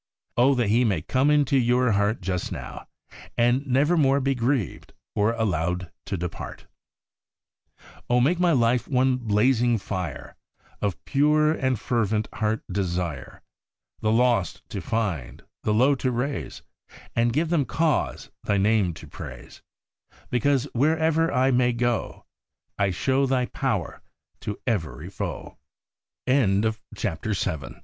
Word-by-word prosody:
Oh, 135 Hz, +3 st, +4 dB
that 120 Hz, -4 st, +1 dB
He 115 Hz, +4 st, +4 dB
may 100 Hz, -10 st, 0 dB
come 130 Hz, +8 st, +2 dB
into 145 Hz, -2 st, +3 dB
your 125 Hz, 0 st, +3 dB
heart 105 Hz, +2 st, +1 dB
just 90 Hz, 0 st, -2 dB
now, -, -, -7 dB, 0.5 s
and 120 Hz, +4 st, +2 dB
nevermore 140 Hz, +1 st, +3 dB
be 135 Hz, 0 st, +1 dB
grieved, 125 Hz, -, -2 dB, 0.2 s
or 105 Hz, +2 st, +2 dB
allowed 90 Hz, -5 st, -1 dB, 0.2 s
to 100 Hz, -, -2 dB
depart! 90 Hz, 0 st, -6 dB, 1.4 s
Oh, 125 Hz, 0 st, +4 dB
make 160 Hz, +8 st, +2 dB
my 180 Hz, -1 st, +4 dB
life 120 Hz, -3 st, +2 dB
one 130 Hz, -1 st, +2 dB
blazing 120 Hz, +1 st, +2 dB
fire 90 Hz, -7 st, -5 dB, 0.5 s
Of 100 Hz, -5 st, -2 dB
pure 150 Hz, +2 st, +3 dB
and 130 Hz, -7 st, 0 dB
fervent 110 Hz, -1 st, 0 dB
heart 110 Hz, 0 st, -1 dB
desire 90 Hz, -7 st, -3 dB, 0.6 s
The 110 Hz, -, +1 dB
lost 115 Hz, -5 st, +1 dB
to -, -, -4 dB
find, 95 Hz, -, -3 dB, 0.2 s
the 105 Hz, -, 0 dB
low 125 Hz, +7 st, +4 dB
to 130 Hz, -1 st, -1 dB
raise, 125 Hz, +4 st, -3 dB, 0.5 s
And 115 Hz, 0 st, +2 dB
give 155 Hz, +6 st, 0 dB
them 165 Hz, -5 st, +3 dB
cause 160 Hz, +2 st, -1 dB
Thy 100 Hz, -, +1 dB
name 100 Hz, -3 st, +2 dB
to -, -, -11 dB
praise, -, -, -10 dB, 0.7 s
Because, 130 Hz, +2 st, +2 dB
wherever 160 Hz, +4 st, +2 dB
I 130 Hz, +1 st, +3 dB
may 125 Hz, -1 st, +3 dB
go, 120 Hz, 0 st, -2 dB, 0.5 s
I 100 Hz, -1 st, +3 dB
show 135 Hz, +9 st, +1 dB
120 Hz, 115 wpm, -25 LUFS, 105-135 Hz, 1.4 s, Oh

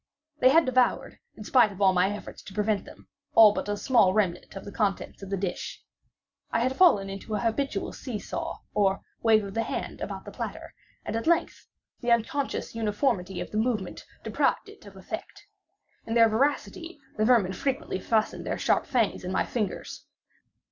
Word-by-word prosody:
They 255 Hz, -, +6 dB
had 325 Hz, +5 st, +5 dB
devoured, 255 Hz, -1 st, +1 dB, 0.2 s
in 215 Hz, -, -9 dB
spite 240 Hz, -1 st, +4 dB
of 195 Hz, -, -11 dB
all 190 Hz, -2 st, +5 dB
my 180 Hz, +1 st, +3 dB
efforts 205 Hz, 0 st, -7 dB
to 190 Hz, -, -12 dB
prevent 210 Hz, -1 st, 0 dB
them, -, -, -15 dB, 0.3 s
all 215 Hz, -2 st, +9 dB
but 205 Hz, -, -4 dB
a 205 Hz, -, -1 dB
small 205 Hz, -4 st, +4 dB
remnant 185 Hz, -4 st, -1 dB
of 195 Hz, -, -8 dB
the 200 Hz, -, -7 dB
contents 200 Hz, -2 st, -2 dB
of 195 Hz, -, -8 dB
the 195 Hz, -, -1 dB
dish. 195 Hz, -, -4 dB, 0.7 s
I 230 Hz, -, 0 dB
had 255 Hz, +2 st, 0 dB
fallen 215 Hz, -, +5 dB
into 195 Hz, +2 st, -5 dB
an -, -, -1 dB
habitual 230 Hz, -1 st, -1 dB
see 250 Hz, -5 st, -5 dB
saw, -, -, -5 dB
or 195 Hz, -2 st, +2 dB, 0.2 s
wave 220 Hz, -2 st, +4 dB
of 195 Hz, -1 st, -7 dB
the 225 Hz, -, 0 dB
hand -, -, -4 dB
about -, -, -5 dB
the -, -, -8 dB
platter; -, -, -6 dB, 0.3 s
and, 215 Hz, -, -3 dB
at 230 Hz, +6 st, -3 dB
length, 340 Hz, 0 st, +1 dB, 0.3 s
the 240 Hz, -1 st, -1 dB
unconscious 235 Hz, +5 st, 0 dB
uniformity 210 Hz, -4 st, -1 dB
of -, -, -6 dB
the 215 Hz, -, -3 dB
movement 220 Hz, -5 st, -2 dB, 0.2 s
deprived -, -, 0 dB
it -, -, -15 dB
of -, -, -13 dB
effect. -, -, -8 dB, 0.6 s
In 225 Hz, -, -2 dB
their 230 Hz, -1 st, +7 dB
voracity 290 Hz, +7 st, -1 dB, 0.2 s
the 215 Hz, -, +2 dB
vermin 220 Hz, -6 st, +4 dB
frequently 270 Hz, -, -2 dB
fastened 220 Hz, +2 st, 0 dB
their -, -, -2 dB
sharp -, -, +1 dB
fangs 240 Hz, -9 st, 0 dB
in 180 Hz, -, -4 dB
my -, -, +1 dB
fingers. 215 Hz, -5 st, -4 dB
215 Hz, 190 wpm, -27 LUFS, 195-250 Hz, 0.7 s, all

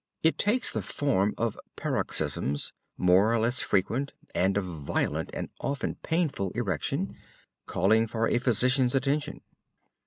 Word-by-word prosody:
It 160 Hz, -, +3 dB
takes 230 Hz, +4 st, +3 dB
the -, -, -2 dB
form 105 Hz, -8 st, 0 dB
of 115 Hz, -2 st, -1 dB, 0.2 s
paroxysms, 70 Hz, +1 st, 0 dB, 0.2 s
more 95 Hz, +4 st, +4 dB
or 115 Hz, -, +3 dB
less 120 Hz, +3 st, +1 dB
frequent, 120 Hz, +8 st, 0 dB, 0.2 s
and 95 Hz, +2 st, +2 dB
of 100 Hz, -, 0 dB
violent 80 Hz, -6 st, -2 dB
and -, -, -5 dB
often 140 Hz, 0 st, -2 dB
painful 160 Hz, -, 0 dB
erection, 100 Hz, -9 st, -1 dB, 0.5 s
calling 110 Hz, +5 st, +3 dB
for 115 Hz, +1 st, 0 dB
a -, -, +2 dB
physician's 125 Hz, +1 st, +3 dB
attention. 140 Hz, +2 st, 0 dB
115 Hz, 130 wpm, -28 LUFS, 95-135 Hz, 0.5 s, more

